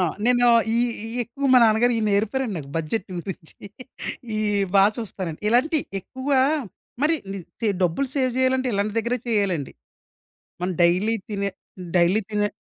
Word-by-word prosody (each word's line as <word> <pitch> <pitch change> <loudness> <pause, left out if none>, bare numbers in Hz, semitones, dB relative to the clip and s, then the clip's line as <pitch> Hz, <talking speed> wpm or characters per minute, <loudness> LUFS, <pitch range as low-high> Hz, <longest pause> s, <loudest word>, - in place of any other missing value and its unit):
ఆ! - - +3 0.2
నేను 245 0 +4 0.3
ఇయి 240 +1 +3 0.2
ఇయ్యెక్కువ 245 +4 -3
మా 255 - +8
నాన్నగారు 230 +2 +4
ఇయి 220 - 0
నేర్పారండి 220 +3 0
నాకు 140 -2 -9
బడ్జెట్ 165 +6 -2
గురించి. 175 -2 -7 0.8
ఇయి 215 -1 0 0.3
బా 195 0 +7
చూస్తానండి. 185 -8 -5
ఇలాంటియి 275 +6 +2 0.2
ఎక్కువా 260 +6 0 0.6
మరి 310 +2 +4 0.2
ని 195 - -5 0.2
చే 225 - +1
డబ్బులు 180 +11 +1
సేవ్ 260 -3 +1
చేయాలంటే 260 0 +2
ఇలాంటి 205 +2 -1
దగ్గరే 235 +3 -1
చేయాలండి. 195 - 0 0.9
మనం 180 +1 -1
డెయిలీ 185 +6 +3
తినే 200 -1 -2 0.5
డెయిలీ 175 +5 +4
తినే 205 0 0
220 Hz, 140 wpm, -23 LUFS, 195-250 Hz, 0.9 s, మా